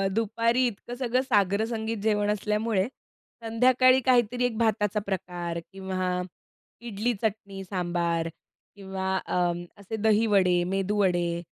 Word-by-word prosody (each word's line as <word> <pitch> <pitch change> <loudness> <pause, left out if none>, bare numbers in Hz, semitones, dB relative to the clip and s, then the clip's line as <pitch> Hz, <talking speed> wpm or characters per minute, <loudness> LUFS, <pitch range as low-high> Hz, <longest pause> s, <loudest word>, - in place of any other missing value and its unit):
दुपारी 230 +3 +1
इतकं 240 +2 -6
सगळं 250 0 0
साग्रसंगीत 220 -1 0
जेवण 210 -1 +1
असल्यामुळे, 210 0 0 0.6
संध्याकाळी 255 +3 +4
काहीतरी 245 -1 +3
एक 225 -3 -2
भाताचा 215 -2 +1
प्रकार 175 -3 -3
किंवा 185 -1 -2 0.6
इडली-चटणी, 210 -3 -3
सांबार 175 -3 -1 0.5
किंवा 190 -1 -3
अ, - - -2 0.4
असे 200 +2 -6
दहीवडे, 205 -5 +3
मेदूवडे 185 -2 0
205 Hz, 100 wpm, -27 LUFS, 190-230 Hz, 0.6 s, संध्याकाळी